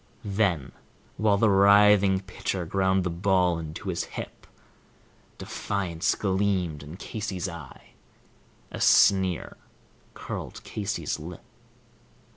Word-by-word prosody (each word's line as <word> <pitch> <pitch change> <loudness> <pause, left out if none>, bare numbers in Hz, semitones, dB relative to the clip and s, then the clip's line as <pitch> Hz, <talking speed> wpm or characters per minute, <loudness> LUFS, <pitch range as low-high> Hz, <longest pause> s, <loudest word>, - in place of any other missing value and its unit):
Then, 95 - 0 0.5
while 105 -2 +3
the 110 - +3
writhing 100 -1 +5
pitcher 95 -1 -4
ground 95 +2 +1
the 90 - -2
ball 90 -1 +1
into 80 -1 -6
his - - -2
hip, - - -9 0.9
Defiance 95 -4 -2
gleamed 95 -6 0
in 75 +4 -10
Casey's 100 -3 -4
eye, 85 -7 -10 0.8
a - - -6
sneer 95 -3 +3 0.6
curled - - -7
Casey's 105 -1 -3
lip. 85 +2 -9
95 Hz, 100 wpm, -26 LUFS, 85-100 Hz, 0.9 s, writhing